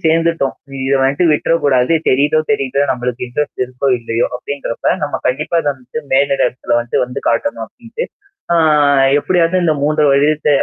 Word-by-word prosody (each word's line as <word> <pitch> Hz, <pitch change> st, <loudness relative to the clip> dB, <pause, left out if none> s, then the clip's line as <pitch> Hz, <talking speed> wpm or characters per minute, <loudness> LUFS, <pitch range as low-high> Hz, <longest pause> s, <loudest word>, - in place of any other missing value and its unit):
சேர்ந்துட்டோம். 165 Hz, -3 st, +1 dB, 0.3 s
இத 135 Hz, -, +2 dB
வன்ட்டு 140 Hz, +6 st, +1 dB
விட்டுறக்கூடாது 145 Hz, -3 st, +2 dB, 0.2 s
தெரியுதோ 145 Hz, +4 st, +3 dB
தெரியுதோ, 140 Hz, -9 st, 0 dB
நம்பளுக்கு 125 Hz, 0 st, -3 dB
இன்ட்ரெஸ்ட் 140 Hz, +2 st, -3 dB
இருக்கோ! 130 Hz, +2 st, -5 dB
இல்லையோ! 115 Hz, 0 st, -1 dB
அப்படின்றப்ப, 140 Hz, -2 st, -4 dB
நம்ம 145 Hz, -, -3 dB
கண்டிப்பா 150 Hz, +6 st, 0 dB
இத 145 Hz, -, -2 dB
வந்துட்டு 130 Hz, +3 st, -8 dB
மேலிட 140 Hz, +1 st, +2 dB
இடத்தல 120 Hz, -1 st, -2 dB
வந்து 120 Hz, -, -4 dB
வந்து 125 Hz, +2 st, -6 dB
காட்டணும் 115 Hz, -1 st, -1 dB
அப்படின்ட்டு, 240 Hz, -, -7 dB, 0.5 s
ஆ -, -, +3 dB, 0.6 s
எப்படியாவது 175 Hz, +2 st, +1 dB
இந்த 155 Hz, -2 st, +2 dB
3 150 Hz, +1 st, +2 dB
வருடத்த 150 Hz, +2 st, +2 dB
140 Hz, 145 wpm, -16 LUFS, 125-155 Hz, 0.6 s, தெரியுதோ